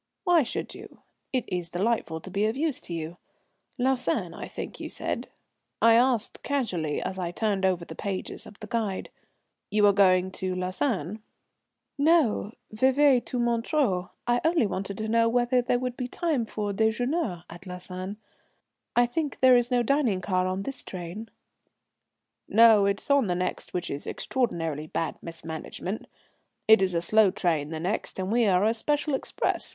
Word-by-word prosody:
"Why 350 Hz, -2 st, +5 dB
should 250 Hz, -, -4 dB
you? -, -, -12 dB, 0.3 s
It 255 Hz, -3 st, 0 dB
is 175 Hz, -2 st, -3 dB
delightful 175 Hz, -3 st, -1 dB
to 190 Hz, -, -10 dB
be 200 Hz, +2 st, +1 dB
of 220 Hz, +4 st, -2 dB
use 300 Hz, -2 st, -1 dB
to -, -, -9 dB
you. 165 Hz, +1 st, -5 dB, 0.6 s
Lausanne 255 Hz, 0 st, 0 dB
I -, -, -7 dB
think -, -, -7 dB
you -, -, -5 dB
said?" -, -, -4 dB, 0.5 s
I 230 Hz, 0 st, +6 dB
asked 240 Hz, -1 st, +2 dB
casually 185 Hz, -, -1 dB
as 190 Hz, 0 st, -4 dB
I 175 Hz, -2 st, -2 dB
turned 195 Hz, +1 st, 0 dB
over 180 Hz, -2 st, -1 dB
the 160 Hz, -, -8 dB
pages 190 Hz, +2 st, -5 dB
of 210 Hz, -, -14 dB
the -, -, -6 dB
guide. 210 Hz, -3 st, -2 dB, 0.6 s
"You 210 Hz, 0 st, +3 dB
are 200 Hz, -, +6 dB
going 185 Hz, -2 st, +4 dB
to 185 Hz, -1 st, -1 dB
Lausanne?" 185 Hz, -, -2 dB, 0.8 s
"No, 285 Hz, -9 st, +3 dB, 0.2 s
Vevey 260 Hz, +3 st, +4 dB
to 250 Hz, -, -4 dB
Montreux. 235 Hz, -, +1 dB, 0.2 s
I 240 Hz, 0 st, +2 dB
only 325 Hz, -6 st, +3 dB
wanted 195 Hz, 0 st, -4 dB
to 220 Hz, -, -3 dB
know 230 Hz, +1 st, +3 dB
whether 245 Hz, +1 st, +2 dB
there 245 Hz, 0 st, +1 dB
would 250 Hz, 0 st, -3 dB
be 250 Hz, -1 st, -3 dB
time 295 Hz, -4 st, -1 dB
for 210 Hz, -2 st, -3 dB
déjeuner 220 Hz, -, 0 dB
at 175 Hz, +3 st, -12 dB
Lausanne. 185 Hz, +2 st, -6 dB, 0.8 s
I 240 Hz, -, +5 dB
think 290 Hz, +3 st, -3 dB
there 260 Hz, -1 st, +7 dB
is 245 Hz, -1 st, +3 dB
no 245 Hz, -1 st, +2 dB
dining 245 Hz, -6 st, +2 dB
car 185 Hz, -1 st, 0 dB
on 185 Hz, +1 st, -2 dB
this 275 Hz, +5 st, -6 dB
train?" 185 Hz, +5 st, -7 dB, 1.2 s
"No, 220 Hz, -3 st, +6 dB
it 200 Hz, 0 st, 0 dB
is -, -, -3 dB
on 280 Hz, -5 st, +4 dB
the 180 Hz, -, 0 dB
next, 180 Hz, +1 st, -3 dB
which 180 Hz, 0 st, -2 dB
is 140 Hz, -, -4 dB
extraordinarily 165 Hz, -, -2 dB
bad 160 Hz, 0 st, -3 dB
mismanagement. 165 Hz, +4 st, -6 dB, 0.6 s
It 220 Hz, -1 st, +7 dB
is 185 Hz, -2 st, +1 dB
a 170 Hz, -, +1 dB
slow 215 Hz, +3 st, +5 dB
train 160 Hz, -5 st, 0 dB
the 160 Hz, -1 st, -4 dB
next, 185 Hz, +6 st, -2 dB
and 190 Hz, +1 st, -2 dB
we 235 Hz, -1 st, +3 dB
are 185 Hz, -1 st, +3 dB
a 220 Hz, -, +3 dB
special 295 Hz, +6 st, 0 dB
express. 265 Hz, -, -1 dB
215 Hz, 175 wpm, -27 LUFS, 185-245 Hz, 1.2 s, there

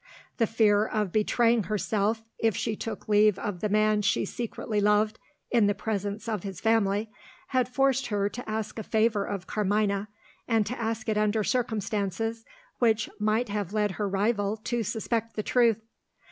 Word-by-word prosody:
The 230 Hz, -, +2 dB
fear 210 Hz, -2 st, +3 dB
of 210 Hz, -4 st, -1 dB
betraying 230 Hz, +1 st, +2 dB
herself 215 Hz, +1 st, 0 dB, 0.2 s
if 225 Hz, -4 st, +2 dB
she 220 Hz, -, -1 dB
took 225 Hz, -, -6 dB
leave 210 Hz, -1 st, +4 dB
of 195 Hz, -3 st, -4 dB
the 210 Hz, -, -1 dB
man 215 Hz, 0 st, +3 dB
she 195 Hz, 0 st, +1 dB
secretly 220 Hz, -1 st, -3 dB
loved, 210 Hz, +1 st, +2 dB, 0.3 s
in 230 Hz, -4 st, +4 dB
the 205 Hz, -, +1 dB
presence 205 Hz, 0 st, -3 dB
of 215 Hz, -4 st, -2 dB
his 195 Hz, -2 st, -6 dB
family, 215 Hz, -1 st, +1 dB, 0.4 s
had 255 Hz, -2 st, +1 dB
forced 270 Hz, 0 st, +2 dB
her 205 Hz, -2 st, 0 dB
to 245 Hz, +3 st, -7 dB
ask 215 Hz, 0 st, -3 dB
a -, -, -2 dB
favour 220 Hz, -1 st, +1 dB
of 195 Hz, -3 st, -4 dB
Carmina, 205 Hz, -1 st, 0 dB, 0.4 s
and 225 Hz, -3 st, +2 dB
to 240 Hz, +3 st, -4 dB
ask 225 Hz, -1 st, -2 dB
it 215 Hz, -1 st, +1 dB
under 215 Hz, 0 st, +1 dB
circumstances 225 Hz, -1 st, -1 dB, 0.4 s
which 225 Hz, -2 st, +2 dB
might 215 Hz, +3 st, +1 dB
have 205 Hz, -2 st, -3 dB
led 210 Hz, -2 st, +1 dB
her 205 Hz, +1 st, -2 dB
rival 205 Hz, +1 st, 0 dB
to 240 Hz, 0 st, -1 dB
suspect 230 Hz, +1 st, -2 dB
the 215 Hz, -, -2 dB
truth. 230 Hz, -3 st, +3 dB
215 Hz, 170 wpm, -27 LUFS, 205-225 Hz, 0.4 s, leave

